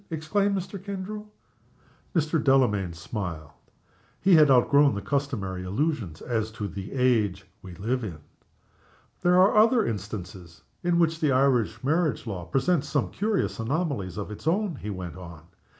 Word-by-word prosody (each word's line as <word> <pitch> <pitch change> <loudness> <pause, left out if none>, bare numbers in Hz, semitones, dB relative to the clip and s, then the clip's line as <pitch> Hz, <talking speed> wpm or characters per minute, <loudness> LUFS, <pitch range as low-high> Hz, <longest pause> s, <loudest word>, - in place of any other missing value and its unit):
exclaimed 195 +6 0
Mr. 190 +1 -6
Kendrew. 200 +2 -6 0.9
Mr. 155 -1 +1
Delamayn 120 -10 +3
smiled. 85 -3 -6 0.7
He 190 - +4
had 155 -3 +7
outgrown 140 +1 +5
the 100 - -3
customary 100 -8 -2
illusions 105 - -2
as 110 -3 -1
to 105 -2 -4
the 95 +1 -7
age 110 -8 +1 0.2
we 90 -2 -10
live 115 +7 -2
in. 90 -8 -5 1.0
"There 180 +1 +4
are 190 +3 +5
other 225 +1 +5
instances 95 -5 -6 0.2
in 175 0 +2
which 165 -1 +2
the 150 -3 +2
Irish 125 -3 +2
marriage 155 -2 +1
law 95 -6 -5
presents 140 - 0
some 145 - 0
curious 210 - -1
anomalies 120 - -2
of 105 0 -5
its 105 - -8
own," 185 -2 +1
he 105 - -6
went 90 -3 -6
on. 85 -4 -10
130 Hz, 150 wpm, -26 LUFS, 100-165 Hz, 1.0 s, had